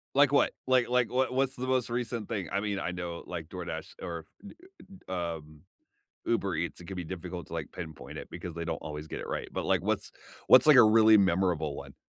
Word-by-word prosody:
Like 140 0 +6
what? 140 - +4 0.2
Like 130 -2 +3
like, 125 -1 +2
what 130 +1 +1
what's 135 +1 0
the 130 +1 -4
most 130 -2 +1
recent 120 -1 -3
thing? 100 -5 -3
I 100 - +1
mean, 100 -2 -2
I 85 - -2
know, 85 -1 -5
like, 85 -3 -5
DoorDash 85 -2 -6
or, 85 -2 -5 0.2
y 205 - -10 0.6
y 85 -2 -2
um, 75 -1 -14 0.6
Uber 100 -5 0
Eats, 85 +2 -3
it - - -10
could 95 - -6
be 90 - -4
difficult 90 0 -6
to, - - -13
like, 80 -3 -5
pinpoint 80 -3 -8
it, - - -8
because 85 - -7
they 85 0 -4
don't 85 - -2
always 75 0 -7
get - - -5
it - - -6
right, - - -4
but, - - -3
like, - - +2
what's - - -1 0.3
what's, 130 +3 +8
like, 150 -3 +8
a - - +10
really 110 0 +7
memorable 85 -5 +2
one? - - -9
95 Hz, 230 wpm, -29 LUFS, 85-120 Hz, 0.6 s, a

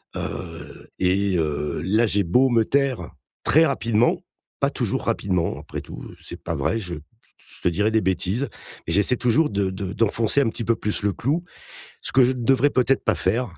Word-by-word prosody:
heu, 85 -2 -7
et 95 +1 +1
heu, 75 -2 -2
là, 110 +5 +2
j'ai 100 -1 +2
beau 125 +10 +3
me 115 -2 +3
taire 135 - 0 0.3
très 160 - +5
rapidement, 115 -5 +1 0.4
pas - - +2
toujours - - 0
rapidement 90 -4 -1
après - - -7
tout, - - -10 0.2
c'est - - -10
pas - - -3
vrai, 115 - 0
je 90 -5 -5 0.4
je - - -7
te - - +1
dirais 105 +6 +1
des 110 0 +2
bêtises, 95 +7 -1 0.4
j'essaie 100 +9 +2
toujours 125 +6 +3
de 100 -1 0
de 95 0 -5
d'enfoncer 115 +4 +2
un 125 - +2
petit 115 - -5
peu 115 - +2
plus 105 -2 0
le 100 - +1
clou. 145 - -1 0.6
Ce - - -1
que 130 -1 +6
je 125 - +3
ne 125 -2 -5
devrais 135 +3 +4
peut-être 130 +1 +2
pas 110 - +2
faire 110 +8 0
110 Hz, 190 wpm, -23 LUFS, 95-125 Hz, 0.6 s, que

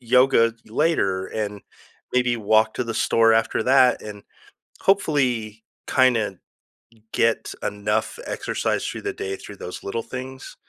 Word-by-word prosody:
yoga 120 -2 +4
later 110 - +1
and 105 -2 -4 0.5
maybe 125 -1 +2
walk 110 0 +2
to 125 - -2
the 115 - -3
store 115 0 +3
after 115 0 +1
that 130 -1 +4
and, 105 -1 -9 0.6
hopefully 125 - +1 0.2
kinda 115 -7 +2 0.8
get 115 -1 +1
enough 105 +1 -1
exercise - - -2
through - - -5
the - - -1
day 95 0 -4
through 100 - -11
those 90 - -8
little 115 +4 -3
things, 130 +1 -8
115 Hz, 130 wpm, -23 LUFS, 105-130 Hz, 0.8 s, yoga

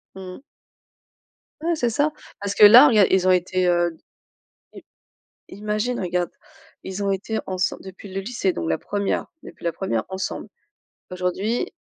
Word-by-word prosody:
Mmh 185 -1 -8
mh. - - -19 1.2
Ouais, 335 +1 0
c'est 245 -6 0
ça. 290 +7 +1 0.3
Parce 200 -1 -3
que - - +8
là, 240 +8 +10
regarde, 215 -7 +5
ils 185 -1 +3
ont 185 - +6
été, 185 0 +1
heu 175 -1 +1 0.8
i - - -12 0.7
imagine, 215 +4 -2
regarde, 180 -1 -1 0.5
ils 190 +1 -5
ont 200 - +1
été 205 +3 -2
ensemble 185 -1 -2
depuis 190 +1 -11
le 195 - -3
lycée 195 -2 -1
donc 85 - -4
la 80 - 0
1re, 200 -1 -2 0.2
depuis - - -13
la 170 - 0
1re 115 - -2
ensemble. 190 +1 -5 0.6
Aujourd'hui, 185 +5 -2
190 Hz, 155 wpm, -23 LUFS, 180-215 Hz, 1.2 s, là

